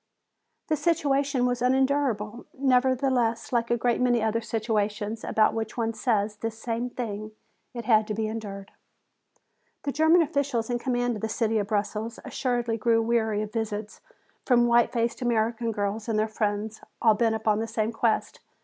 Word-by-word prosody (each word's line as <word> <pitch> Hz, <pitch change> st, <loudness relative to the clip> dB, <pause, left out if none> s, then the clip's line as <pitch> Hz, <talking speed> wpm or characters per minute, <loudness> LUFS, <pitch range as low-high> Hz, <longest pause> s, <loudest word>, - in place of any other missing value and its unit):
The 315 Hz, -, +2 dB
situation 285 Hz, -4 st, +1 dB
was 245 Hz, -1 st, 0 dB
unendurable; 250 Hz, -4 st, +1 dB
nevertheless, 255 Hz, -3 st, +1 dB
like 235 Hz, -1 st, +1 dB
a 240 Hz, -, +2 dB
great 240 Hz, +1 st, +1 dB
many 245 Hz, -1 st, +3 dB
other 220 Hz, +1 st, 0 dB
situations 215 Hz, -1 st, -2 dB
about 215 Hz, -1 st, +2 dB
which 220 Hz, 0 st, -4 dB
one 230 Hz, -1 st, 0 dB
says 215 Hz, -3 st, 0 dB
this 225 Hz, 0 st, -4 dB
same 235 Hz, +1 st, -3 dB
thing, 215 Hz, -3 st, -5 dB, 0.4 s
it 235 Hz, -2 st, -5 dB
had 220 Hz, -2 st, +4 dB
to 210 Hz, -, -2 dB
be 220 Hz, +1 st, -1 dB
endured. 205 Hz, -3 st, -6 dB, 1.1 s
The 285 Hz, -, -1 dB
German 315 Hz, +4 st, +5 dB
officials 280 Hz, -6 st, -1 dB
in 240 Hz, -, 0 dB
command 245 Hz, -2 st, 0 dB
of -, -, -9 dB
the 220 Hz, -, -2 dB
city 225 Hz, -1 st, 0 dB
of 205 Hz, -, -2 dB
Brussels 215 Hz, +2 st, -2 dB
assuredly 240 Hz, -3 st, -1 dB
grew 230 Hz, +1 st, +3 dB
weary 220 Hz, -2 st, +1 dB
of 215 Hz, -, -8 dB
visits 215 Hz, -2 st, -4 dB, 0.4 s
from 240 Hz, -2 st, +4 dB
white 235 Hz, 0 st, +4 dB
faced 235 Hz, 0 st, -1 dB
American 230 Hz, -1 st, 0 dB
girls 205 Hz, +2 st, -3 dB
and 220 Hz, -, +1 dB
their 215 Hz, +1 st, +2 dB
friends, 215 Hz, 0 st, -2 dB, 0.2 s
all 220 Hz, -2 st, +5 dB
bent 225 Hz, +1 st, +1 dB
upon 220 Hz, -1 st, +1 dB
the 225 Hz, -, -2 dB
same 220 Hz, 0 st, -1 dB
quest. 225 Hz, -1 st, 0 dB
230 Hz, 165 wpm, -26 LUFS, 215-245 Hz, 1.1 s, German